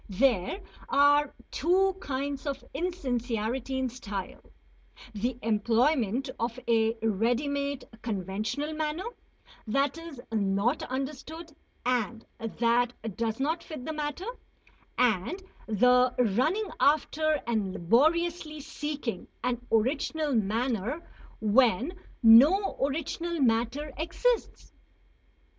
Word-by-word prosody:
There 230 - +2 0.3
are 290 +1 +4 0.2
two 375 +4 +2
kinds 280 0 -3
of 275 -1 -3
insincerity 255 -7 -2
in 260 0 0
style, 210 -6 -6 0.7
the 235 +4 -2
employment 235 +3 +2
of 230 +1 -2
a 225 0 +2
ready 230 +6 +1
made 280 -1 -2 0.2
conventional 215 - -3
manner 310 +3 -2 0.6
that 275 +7 +1
is 330 -6 -9
not 205 +5 +1
understood 300 +4 -5 0.3
and 240 -2 0
that 235 +2 +1 0.2
does 225 0 -2
not 315 +5 0
fit 305 -6 -8
the 315 - -3
matter; 300 +4 -3 0.7
and 250 - +1 0.2
the 250 +3 +4
running 260 - +1
after 310 +1 +2
and 215 -5 0
laboriously 310 - +1
seeking 285 -8 -4 0.2
an 245 -1 -1
original 285 +6 +1
manner 230 - -1 0.3
when 235 - +3 0.3
no 285 - +7
original 325 +4 -2
matter 250 +4 +1
exists. 465 +9 -1
260 Hz, 100 wpm, -28 LUFS, 225-300 Hz, 0.7 s, no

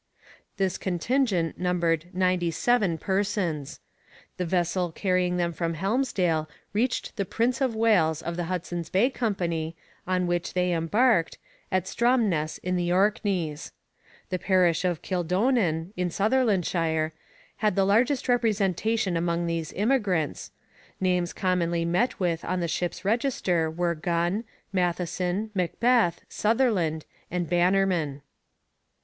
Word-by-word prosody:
This 190 -2 0
contingent 190 -1 0
numbered 170 -3 +1
ninety 180 -1 +1
seven 200 -1 +1
persons. 190 -6 -2 0.6
The 180 - -2
vessel 175 0 0
carrying 180 0 0
them 170 -1 0
from 165 0 -2
Helmsdale 185 -6 0 0.2
reached 240 +4 -1
the 200 - +1
Prince 235 +6 -1
of 255 -4 +1
Wales 180 -8 +2
of 170 +1 -3
the 175 0 -2
Hudson's 175 -1 -4
Bay 225 +8 +3
Company, 170 -9 -2 0.3
on 185 -1 +1
which 175 +1 -2
they 180 -1 +2
embarked, 170 +3 +2 0.3
at 185 -1 +2
Stromness 220 -11 +1
in 180 0 0
the 175 0 0
Orkneys. 185 -5 0 0.6
The 185 - -1
parish 180 -3 +2
of 175 -4 -1
Kildonan, 180 -1 0
in 180 0 -1
Sutherlandshire, 180 -8 +1 0.5
had 215 -1 +1
the 195 -1 +3
largest 240 +7 +2
representation 220 -4 +1
among 170 0 0
these 165 -2 -2
emigrants. 200 - 0 0.5
Names 180 -2 +1
commonly 170 -2 0
met 180 +9 0
with 170 -3 0
on 185 0 -1
the 170 - -1
ship's 175 +3 -3
register 200 - +1
were 170 +1 0
Gunn, 175 +6 -1 0.3
Matheson, 180 +3 -1
MacBeth, 195 +1 +2
Sutherland, 210 - +1 0.2
and 175 -1 -2
Bannerman. 175 -5 +1
180 Hz, 120 wpm, -26 LUFS, 170-205 Hz, 0.6 s, Bay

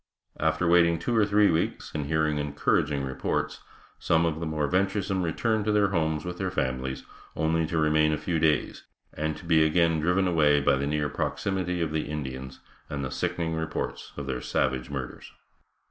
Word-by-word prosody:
After 90 - +1
waiting 85 -1 +5
two 100 +9 -2
or 105 -2 +4
three 105 -1 +4
weeks, 80 0 -1
and 75 -2 -3
hearing 80 -1 +1
encouraging 75 0 0
reports, 65 -1 -2 0.4
some 80 0 +2
of 80 -1 -1
the 85 - -3
more 75 -1 -1
venturesome 95 +3 0
returned 110 +6 0
to 105 - +2
their 105 -1 +3
homes 80 -4 0
with 90 0 -5
their 95 - -1
families, 65 -5 -2 0.3
only 80 0 +1
to 85 - -2
remain 75 0 +3
a 75 - 0
few 85 0 -1
days, 80 -2 +1 0.3
and 75 0 -2
to - - -12
be 80 -2 +4
again 80 0 +3
driven 90 +4 +2
away 75 -4 +4
by 70 0 +3
the 70 +1 -1
near 75 0 0
proximity 90 +2 -2
of 80 - -2
the 80 -2 -2
Indians, 65 -3 -6 0.3
and 70 -2 -3
the 65 - -5
sickening 80 -1 -2
reports 80 0 -4
of 70 - -4
their 65 -2 -3
savage 65 0 -1
murders. 70 -3 -6
80 Hz, 185 wpm, -27 LUFS, 75-90 Hz, 0.4 s, waiting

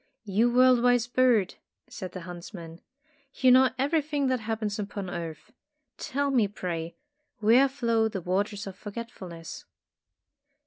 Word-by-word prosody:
''You 220 +5 +2
world 255 0 +5
wise 245 -1 +3
bird," 240 -5 +2 0.3
said 185 -4 -8
the 185 - -6
hunts 175 +3 -9
man, 165 -1 -10 0.5
"you 260 -1 +4
know 260 +1 +6
everything 290 0 0
that 255 -1 +1
happens 220 -1 -3
upon 200 -2 -5
earth. 165 -3 -7 0.5
Tell 280 +1 -1
me, 235 -6 +3
pray, 170 -4 -5 0.4
where 240 +5 +5
flow 230 -4 +1
the 205 -3 -4
Waters 200 +3 -2
of 195 -2 -7
Forgetfulness?" 200 -6 -8
220 Hz, 135 wpm, -27 LUFS, 185-250 Hz, 0.5 s, know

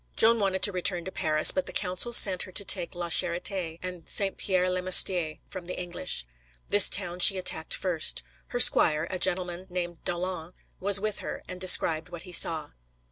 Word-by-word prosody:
Joan 230 +1 +3
wanted 190 -2 -3
to 205 - +3
return 180 -2 -2
to 190 - -8
Paris, 155 -3 +4
but 280 - -4
the - - -8
council 185 +5 0
sent 190 -6 +3
her 185 - -2
to 200 - -3
take 175 - -1
La 175 -1 -6
Charité 170 0 -1
and 180 -3 -9
Saint 195 -1 -2
Pierre 185 -2 -1
le 185 0 -3
Moustier 180 -3 +2
from 185 -3 -11
the 180 - -7
English. 175 - -4 0.4
This 205 -1 +8
town 180 -3 -2
she 190 +1 +6
attacked 170 -3 -4
first. 175 - -1 0.2
Her - - -6
squire, 155 +1 +5
a 185 - -5
gentleman 180 0 -2
named 175 -1 -7
d'Aulon, 175 -1 -6 0.3
was 200 +1 +3
with 215 0 -4
her, - - -9
and 180 0 -10
described 165 -2 +3
what 175 -1 -10
he 180 - -13
saw. 165 -2 0
180 Hz, 190 wpm, -25 LUFS, 175-190 Hz, 0.4 s, This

